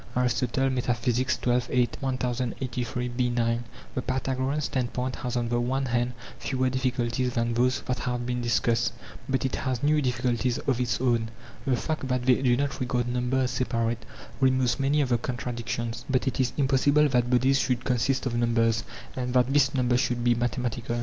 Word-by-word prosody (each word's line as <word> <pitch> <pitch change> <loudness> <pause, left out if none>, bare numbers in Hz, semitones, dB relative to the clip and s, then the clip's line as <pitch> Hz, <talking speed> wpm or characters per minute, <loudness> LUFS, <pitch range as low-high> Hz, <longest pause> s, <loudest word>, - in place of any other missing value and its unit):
xii. 125 0 +1
8; - - -16 1.5
1083b9. 125 -2 -1 0.3
The 130 - -1
Pythagorean 130 +2 -1
standpoint 130 -1 -2
has 125 -1 -4
on 120 -1 -1
the 120 0 +1
one 135 +3 0
hand 120 0 0 0.3
fewer 130 -1 0
difficulties 125 -1 -1
than 115 0 +1
those 125 +2 +2
that 125 - -3
have 125 -2 -2
been 125 0 -2
discussed, 115 -1 +1 0.4
but 135 0 +1
it 130 - -1
has 130 -3 -2
new 150 +1 +3
difficulties 125 -1 0
of 130 -2 -1
its 120 -2 0
own. 120 -3 +1 0.4
The 130 - +3
fact 155 0 -3
that 125 -1 0
they 130 0 +4
do 125 -2 +3
not 140 +1 -1
regard 125 -1 -1
number 125 +1 0
as 125 -1 0
separate, 115 -2 -1 0.4
removes 130 -1 +2
many 140 +2 +2
of 135 - 0
the 120 -2 +2
contradictions; 120 -1 -4
but 130 0 +1
it 130 - -1
is 130 -1 +2
impossible 140 +2 +4
that 125 -2 +2
bodies 130 +2 +3
should 125 -2 0
consist 130 +1 +1
of 125 - -1
numbers, 115 -1 +2 0.3
and 125 -1 -3
that 125 +1 +3
this 140 -2 +4
number 125 -2 +2
should 125 -1 0
be 120 0 +4
mathematical. 120 0 -2
125 Hz, 170 wpm, -27 LUFS, 120-130 Hz, 1.5 s, they